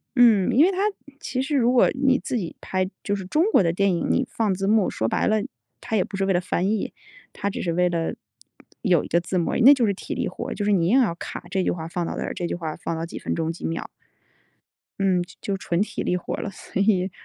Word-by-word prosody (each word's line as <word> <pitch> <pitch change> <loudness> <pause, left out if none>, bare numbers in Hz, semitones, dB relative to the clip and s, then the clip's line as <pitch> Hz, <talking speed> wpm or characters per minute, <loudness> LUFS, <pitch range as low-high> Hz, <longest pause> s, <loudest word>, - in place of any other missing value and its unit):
嗯， 230 -6 +5
因 285 +7 +6
为 380 - +3
它 370 - -5 0.4
其 255 0 -2
实 290 +2 -1
如 245 -2 +3
果 250 - +5
你 265 -1 +2
自 250 - -3
己 175 -6 -4
拍， 185 0 -2
就 205 - 0
是 195 -2 -6
中 305 - +2
国 - - +5
的 165 - +2
电 195 +2 +2
影， 170 - -1
你 260 - +1
放 215 -4 0
字 195 +1 -2
幕， 210 -2 +3
说 110 - -1
白 - - 0
了， 215 - +3 0.4
它 220 - -3
也 195 - +3
不 195 - -7
是 195 - +1
为 195 - +2
了 175 - +2
翻 185 +1 -1
译。 215 -2 -1 0.4
它 200 - -2
只 - - -5
是 170 - -1
为 180 +2 +2
了 165 -2 -1 0.7
有 180 -8 +2
一 - - -7
个 170 - +2
字 180 +2 -2
幕 170 - 0
而 - - -1
已。 - - +2
那 265 +5 +9
就 255 -4 +2
是 200 - +1
体 190 - -6
力 - - -2
活 - - -5
儿， - - -3
就 205 - -3
是 205 - +3
你 170 -4 +2
硬 245 +8 +5
要 205 -9 +1
卡 175 - -7
这 190 -1 0
句 - - +1
话 160 -2 -5
放 175 +1 -3
到 - - -4
这 - - -3
儿， - - -4
这 175 - -3
句 - - -2
话 160 -3 -4
放 - - -4
到 165 - -3
几 170 - -8
分 - - -3
钟 165 0 -1
几 165 - -8
秒。 165 - -3 1.1
嗯， 190 -2 +2
就 175 - -15
就 195 -1 -2
纯 175 -1 -1
体 210 - -2
力 180 - 0
活 180 - -3
儿 - - -5
了， 210 - -3
所 195 - -4
以 195 -2 +2
195 Hz, 305 characters per minute, -24 LUFS, 175-220 Hz, 1.1 s, 那